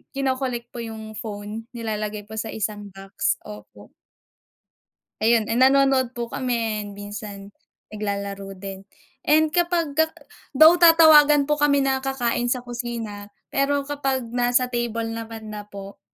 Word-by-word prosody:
kino-collect 260 -3 -2
po 240 - -8
yung 220 -1 -7
phone, 215 +1 -7
nilalagay 215 -2 -4
po 220 +1 -7
sa 225 - -3
isang 210 -1 -4
box, 195 0 -2
opo. 105 0 -12 1.3
Ayun, 225 -1 +3
eh - - -2
nanonood 260 -1 +3
po 235 - -2
kami, 230 -4 -1 0.2
minsan 205 -1 -8 0.4
naglalaro 200 -2 -4
din 195 0 -7 0.4
and 310 0 +3
kapagka 330 -3 +1 0.5
though 315 +4 +8
tatawagan 305 -3 +7
po 300 - +1
kami 285 -1 +4
na 265 0 +1
kakain 245 -3 -1
sa 250 -1 -1
kusina, 230 -4 -6 0.2
pero 280 0 +1
kapag 270 -3 -2
nasa 245 +1 +2
table 240 -2 -2
naman 225 -1 -7
na 210 - -5
po, 200 0 -10
235 Hz, 130 wpm, -23 LUFS, 210-270 Hz, 1.3 s, though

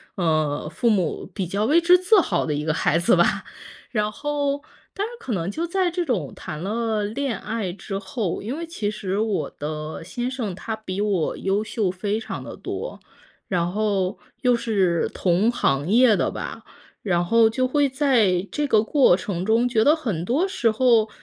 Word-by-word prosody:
呃， 155 -5 0
父 230 +9 0
母 190 -5 0
比 190 - -1
较 200 +5 -1
为 305 +8 +5
之 350 +1 +6
自 370 +4 +5
豪 180 - 0
的 150 - 0
一 150 +1 -3
个 155 - +1
孩 160 - +2
子 180 +9 +4
吧。 - - +2 0.5
然 210 -2 0
后 285 +2 -2 0.3
但 400 - -1
是 455 - -7
可 255 - -6
能 175 -2 -2
就 335 +8 -3
在 365 0 +1
这 350 +1 -1
种 205 - -2
谈 155 - -7
了 220 +2 -1
恋 240 +3 -2
爱 215 -4 -3
之 195 +2 -5
后， 195 -1 -3
因 235 +8 -4
为 335 - -4
其 320 -11 -3
实 200 -2 -3
我 215 -2 -1
的 155 +2 -5
先 240 +8 -3
生 235 -8 -4
他 220 +4 -4
比 200 -3 -6
我 195 -6 0
优 195 +2 0
秀 220 -3 -1
非 200 +4 -2
常 220 -1 -6
得 - - -8
多， - - -6 0.5
然 175 -2 0
后 200 -1 0 0.2
又 250 -2 +4
是 195 -8 +1
同 190 +6 +2
行 145 - 0
业 235 +1 +6
的 - - +1
吧， - - -6 0.4
然 175 -4 +1
后 225 +4 +5
就 255 +3 0
会 285 +1 +2
在 230 -10 +2
这 295 -1 -1
个 215 -5 +4
过 255 -7 +4
程 185 -2 -3
中， 225 +4 +3
觉 225 -3 +2
得 295 +5 +5
很 220 - -3
多 280 - +1
时 375 -12 +1
候， 225 -1 +3
215 Hz, 205 characters per minute, -23 LUFS, 185-255 Hz, 0.5 s, 之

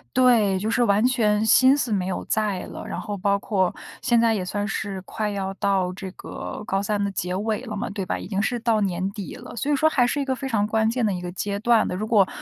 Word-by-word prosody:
对， 225 -7 +4
就 215 +3 -2
是 240 +1 +2
完 205 0 +3
全 220 -4 +2
心 260 +5 +6
思 250 -4 -1
没 190 -3 0
有 185 - -3
在 210 -4 0
了。 - - -8
然 - - -4
后 205 -1 -4
包 200 +1 +1
括 190 -4 0 0.3
现 240 -3 +3
在 230 -1 +4
也 195 -4 -1
算 205 +3 -2
是 200 -3 -3
快 215 +2 -3
要 195 -1 -3
到 190 -2 0
这 190 0 -7
个 - - -7
高 195 +1 0
三 205 0 -1
的 200 - 0
结 180 -1 -3
尾 215 +3 -1
了 215 -4 -5
嘛， 240 +3 -3
对 200 -2 -4
吧， - - -2
已 - - -7
经 200 -1 -1
是 240 +3 -1
到 225 -2 +1
年 185 -1 -1
底 200 -3 -7
了。 245 0 -10
所 275 +6 -1
以 - - +4
说 310 +3 +3
还 255 -5 +3
是 285 +4 0
一 280 - -1
个 265 -1 0
非 265 +1 -5
常 210 -3 +1
关 220 0 +2
键 235 0 0
的 205 - +1
一 180 - -4
个 180 0 -5
阶 200 +2 -3
段 230 0 +3
的。 - - -3
如 210 - -2
果 210 -4 +4
210 Hz, 290 characters per minute, -24 LUFS, 195-235 Hz, 0.3 s, 心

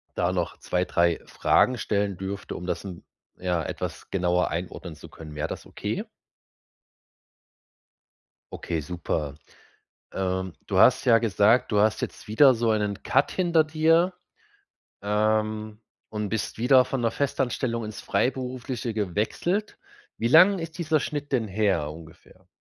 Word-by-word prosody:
da 90 +1 +1
noch 90 -2 -2
2, 90 0 -1
3 85 -1 +2
Fragen 125 -1 +2
stellen 100 -3 -1
dürfte, 95 +1 -5
um 90 - -7
das, 90 +1 -2
hm, 90 -3 -8 0.4
ja, 90 -3 -1
etwas - - -6
genauer 90 -1 +1
einordnen 85 -1 -5
zu 75 - -13
können. 75 -2 -11
Wäre 75 - -2
das - - -7
okay? - - -4 2.5
Okay, 80 -2 -3
super. 75 -2 -3 0.8
Ähm, 95 -1 -2 0.2
du 95 -2 0
hast 130 +6 +6
ja 115 -2 +6
gesagt, 110 +2 +3
du 105 - +3
hast 110 0 +2
jetzt - - -6
wieder 130 +4 +6
so 115 0 0
einen 105 -2 -1
Cut 135 +2 +2
hinter 170 -4 +3
dir, 165 +3 +2 0.9
ähm, 110 +1 0 0.3
und 105 -1 -3
bist 110 +1 -3
wieder 130 +2 +5
von 135 0 -3
der 115 -1 +1
Festanstellung 125 -4 -1
ins 105 - -8
Freiberufliche 125 -2 -2
gewechselt. 110 - -2 0.4
Wie 115 - 0
lang 180 +8 +7
ist 165 0 -6
dieser 160 -3 +1
Schnitt 145 -1 -4
denn 115 -5 +1
her 95 -7 0
ungefähr? 85 +3 -14
110 Hz, 140 wpm, -26 LUFS, 90-130 Hz, 2.5 s, lang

